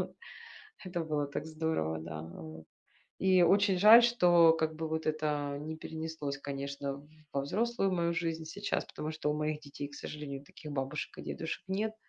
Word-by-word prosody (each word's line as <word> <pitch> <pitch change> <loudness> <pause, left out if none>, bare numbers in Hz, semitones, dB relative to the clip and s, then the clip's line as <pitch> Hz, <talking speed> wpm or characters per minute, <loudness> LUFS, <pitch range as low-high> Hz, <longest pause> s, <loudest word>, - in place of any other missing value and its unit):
вот. - - -5 0.7
Это 175 -2 -3
было 150 -2 -1
так 145 +1 -4
здорово, 155 - -1
да, 80 -1 -6
вот. 80 -1 -9 0.5
И 185 -2 +5
очень 195 +2 +4
жаль, 215 +5 +10
что, 175 -9 +6
как 160 -1 0
бы, 160 0 -3
вот, 160 0 -2
это 150 -2 -1
не 155 +2 -5
перенеслось, 160 -3 -5
конечно, 140 0 -4 0.3
во 140 - +1
взрослую 200 - 0
мою 170 -1 +1
жизнь, 165 -1 -2
сейчас 200 +6 -2
потому 155 +1 -5
что 155 -1 -2
у 150 - 0
моих 150 0 -1
детей, 145 -1 -7
к 145 - -17
сожалению, 145 -2 -6
таких 150 +1 -10
бабушек 135 +1 -3
и - - -6
дедушек 160 - -4
нет. 215 +3 -1
155 Hz, 175 wpm, -32 LUFS, 140-170 Hz, 0.7 s, жаль